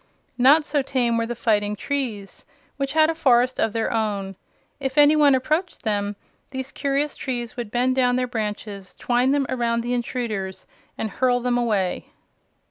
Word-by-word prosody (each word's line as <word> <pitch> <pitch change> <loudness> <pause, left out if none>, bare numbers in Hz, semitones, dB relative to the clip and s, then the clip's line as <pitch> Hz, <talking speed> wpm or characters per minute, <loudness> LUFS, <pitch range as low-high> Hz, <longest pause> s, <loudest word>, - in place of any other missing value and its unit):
Not 290 +5 +6
so 290 -1 +1
tame 250 -3 0
were 230 0 0
the 240 - -4
Fighting 210 -2 +1
Trees, 220 -5 -4 0.3
which 275 0 -2
had 315 0 +4
a - - -3
forest 255 -5 +3
of 225 - +2
their 225 +2 -1
own. 200 -3 -2 0.4
If 270 -1 -3
any 295 +1 +7
one 290 -3 +5
approached 310 +8 -1
them 205 -2 -1 0.3
these 265 -1 -5
curious 280 +1 -1
trees 240 -3 -4
would 240 -4 -5
bend 250 +3 +1
down 250 -1 +3
their 255 0 +1
branches, 210 -4 -5
twine 245 +1 +1
them 280 0 +2
around 235 -2 0
the 240 +1 -2
intruders, 225 -6 -3 0.3
and 220 - -3
hurl 250 -1 +2
them 245 0 0
away. 210 -7 0
245 Hz, 170 wpm, -23 LUFS, 220-270 Hz, 0.4 s, any